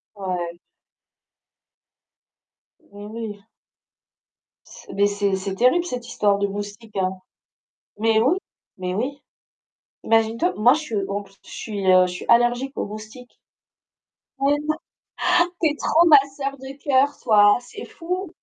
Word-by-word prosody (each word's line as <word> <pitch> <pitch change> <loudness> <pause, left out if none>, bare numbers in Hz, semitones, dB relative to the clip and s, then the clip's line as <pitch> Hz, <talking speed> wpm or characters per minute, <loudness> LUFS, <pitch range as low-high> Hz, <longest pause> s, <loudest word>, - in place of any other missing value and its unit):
Ouais. 180 -3 -4 2.2
Mais - - -28 0.2
oui. 215 -2 -7 1.2
C'est - - -13
mais 200 +1 +3
c'est 200 -1 0
c'est 190 0 -4
terrible 255 - +3
cette 250 -7 -5
histoire 205 -3 +1
de 200 - +1
moustiques, 205 +2 -7
hein. 190 0 -1 0.8
Mais 220 +1 +3
oui, 270 +11 +3 0.4
mais 180 -1 -3
oui. 275 +7 -3 0.8
Imagine-toi, 225 +9 +2
moi 235 +4 +6
je 305 - -2
suis 270 -8 -5
en 200 +1 -2
plus, 195 0 -21
je - - -15
suis, 205 -3 -5
heu, 185 0 +6
je - - -5
suis 180 - -7
allergique 240 +3 +3
aux - - -1
moustiques. 215 +4 -11 1.0
Mais 280 +1 +3
non, 310 0 0 0.9
tu 325 - +4
es 295 - -3
trop 330 +3 +3
ma 300 -3 +9 0.2
sœur 275 0 -4
de 265 +1 -10
cœur, 275 0 +3
toi, 205 -3 +5
c'est 245 - -10
fou. 365 +3 -5
225 Hz, 140 wpm, -22 LUFS, 200-275 Hz, 2.2 s, ma